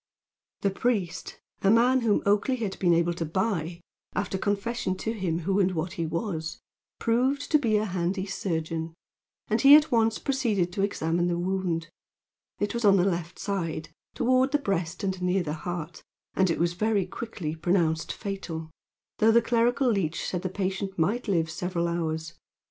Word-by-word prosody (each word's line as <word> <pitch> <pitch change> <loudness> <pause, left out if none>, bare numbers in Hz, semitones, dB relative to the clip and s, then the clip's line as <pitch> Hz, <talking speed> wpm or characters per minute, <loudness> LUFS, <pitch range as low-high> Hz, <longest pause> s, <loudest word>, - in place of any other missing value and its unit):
The 200 - +1
priest, 195 -6 -2 0.2
a 195 - +3
man 245 +4 +5
whom 220 -3 +2
Oakleigh 205 +6 +2
had 205 -5 -4
been 180 -2 +3
able 170 +1 +2
to 170 - -3
buy, 170 0 -2 0.3
after 200 -1 -1
confession 205 -1 -1
to 225 +4 -2
him 175 -6 -2
who 195 +4 +1
and 190 -1 +2
what 170 +3 -2
he 170 -5 -2
was, 165 -1 -3 0.4
proved 255 +5 +1
to 305 - +6
be 225 -6 +2
a 210 - 0
handy 185 0 -1
surgeon, 165 -4 -3 0.5
and 220 +1 +1
he 275 +1 +10
at 305 +1 +5
once 225 -2 +3
proceeded 215 -10 0
to 195 - -1
examine 175 -3 0
the 175 -1 0
wound. 175 -2 -1 0.7
It 205 - -1
was 235 0 -2
in 200 -2 +6
the 180 - +3
left 175 -2 -2
side, 170 -6 -3 0.3
toward 255 +2 +3
the - - +5
breast 195 - -2
and 190 -2 -2
near 180 +1 +1
the 150 -2 -3
heart, 170 0 -5 0.3
and 190 -1 +2
it 165 - 0
was 170 +1 +1
very 205 0 +1
quickly 190 -9 -5
pronounced 165 -1 +1
fatal, 170 -6 -5 0.5
though 220 +1 +5
the 235 - +6
clerical 240 +3 +2
leech 175 -6 -1
said 180 - -2
the 185 - -2
patient 195 +1 -3
might 205 +10 0
live 170 -5 +2
several 175 0 -2
hours. 160 -1 -2
190 Hz, 175 wpm, -27 LUFS, 170-220 Hz, 0.7 s, he